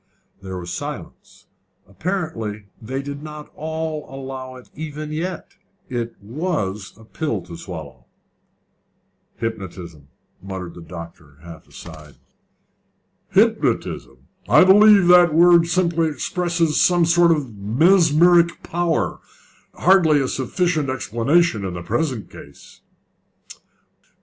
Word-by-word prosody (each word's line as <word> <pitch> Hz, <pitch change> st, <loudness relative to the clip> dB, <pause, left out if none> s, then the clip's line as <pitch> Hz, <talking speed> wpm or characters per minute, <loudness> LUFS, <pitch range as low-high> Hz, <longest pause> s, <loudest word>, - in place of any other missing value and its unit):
There 95 Hz, -1 st, -6 dB
was 85 Hz, -1 st, -6 dB
silence. -, -, -8 dB, 0.4 s
Apparently 110 Hz, -, -4 dB, 0.2 s
they 130 Hz, +5 st, -4 dB
did 140 Hz, 0 st, -7 dB
not 150 Hz, -1 st, -10 dB
all 160 Hz, -1 st, -4 dB
allow 130 Hz, -1 st, -7 dB
it 125 Hz, -, -15 dB
even 155 Hz, 0 st, -7 dB
yet: 175 Hz, +5 st, -5 dB, 0.3 s
it 120 Hz, -2 st, -4 dB
was 105 Hz, -, -4 dB
a 110 Hz, -, -16 dB
pill 115 Hz, -, -3 dB
to 85 Hz, -1 st, -10 dB
swallow. 75 Hz, -8 st, -9 dB, 1.3 s
"Hypnotism," 90 Hz, -9 st, -6 dB, 0.3 s
muttered 95 Hz, -3 st, -7 dB
the 85 Hz, -, -12 dB
doctor, 85 Hz, -4 st, -11 dB
half 85 Hz, -2 st, -12 dB
aside. 75 Hz, -3 st, -12 dB, 1.1 s
"Hypnotism! -, -, 0 dB, 0.3 s
I -, -, +7 dB
believe 205 Hz, +1 st, +7 dB
that 180 Hz, -1 st, +7 dB
the 155 Hz, -, -4 dB
word 170 Hz, 0 st, +6 dB
simply 170 Hz, -2 st, +1 dB
expresses 170 Hz, +2 st, -1 dB
some 175 Hz, -1 st, +4 dB
sort 170 Hz, +1 st, +4 dB
of 140 Hz, -9 st, -1 dB
mesmeric 170 Hz, -, +3 dB
power 170 Hz, -1 st, -1 dB, 0.6 s
hardly 170 Hz, -5 st, +4 dB
a 135 Hz, -, 0 dB
sufficient 155 Hz, +3 st, -1 dB
explanation 130 Hz, -, +1 dB
in 95 Hz, -2 st, -4 dB
the 85 Hz, -, -6 dB
present 120 Hz, -, -2 dB
case." 70 Hz, -, -15 dB
140 Hz, 110 wpm, -21 LUFS, -, 1.3 s, I